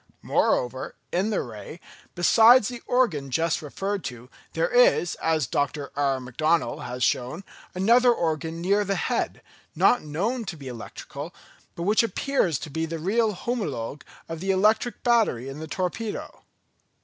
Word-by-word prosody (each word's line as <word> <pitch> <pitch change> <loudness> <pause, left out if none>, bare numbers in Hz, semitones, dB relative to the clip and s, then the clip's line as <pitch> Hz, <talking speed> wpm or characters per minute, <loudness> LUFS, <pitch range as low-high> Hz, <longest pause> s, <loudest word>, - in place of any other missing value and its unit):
Moreover, 130 +1 0 0.2
in 190 +5 +1
the 215 - 0
ray, 120 +7 -9 0.4
besides 225 +6 +6
the 245 -1 -7
organ 190 - +1
just 165 +5 0
referred 195 +5 -3
to, 125 +1 -8 0.2
there - - +1
is, - - +4
as 160 -3 +1
Dr. 145 +3 -2
R. 140 -2 +1
McDonnell 155 +6 0
has 125 +1 -3
shown, 130 +9 0 0.3
another 235 +6 +5
organ 160 - -2
near 200 +4 +2
the 195 0 -1
head, - - -2 0.3
not 245 - +4
known 200 +12 -2
to 175 - -6
be 140 -2 -10
electrical, 140 +6 -8 0.4
but 170 - -4
which 210 +4 +4
appears 230 - 0
to 155 - -7
be 160 +2 -2
the 165 +1 -4
real 210 +6 +1
homologue 150 - -3 0.3
of 165 -1 -6
the 190 +3 -4
electric 210 +4 +2
battery 220 - +2
in 135 +2 -7
the 160 - -6
torpedo. 185 +6 -4
170 Hz, 150 wpm, -25 LUFS, 145-215 Hz, 0.4 s, besides